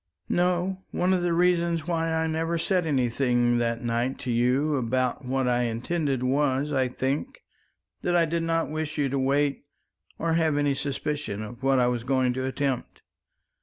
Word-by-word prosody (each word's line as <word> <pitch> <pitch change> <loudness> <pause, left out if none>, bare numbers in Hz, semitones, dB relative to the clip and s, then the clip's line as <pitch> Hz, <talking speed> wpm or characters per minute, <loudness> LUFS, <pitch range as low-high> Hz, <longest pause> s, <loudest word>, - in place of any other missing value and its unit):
"No, 180 +1 +1
one 180 +1 +1
of 185 - +1
the 175 0 0
reasons 170 -1 +2
why 165 -2 0
I 160 0 +1
never 165 +1 -1
said 175 +1 +1
anything 120 -3 +2
that 115 0 -1
night 120 +2 -1
to 125 - -2
you 125 +6 +2
about 130 +2 -1
what 130 0 0
I 120 0 +2
intended 130 +3 -1
was, 140 +2 +1
I 130 -2 +2
think, 135 - -3 0.6
that 175 - 0
I 170 -1 +4
did 165 +1 -1
not 165 -2 0
wish 155 0 -3
you 140 -2 +1
to 135 +1 -1
wait 140 +1 0 0.5
or 165 -1 0
have 160 -3 +2
any 145 -1 +2
suspicion 140 -5 -3
of 120 +3 -9
what 135 0 +3
I 125 - +4
was 120 -1 0
going 130 -1 +1
to 130 +1 -2
attempt." 130 -1 -3
140 Hz, 175 wpm, -26 LUFS, 125-165 Hz, 0.6 s, I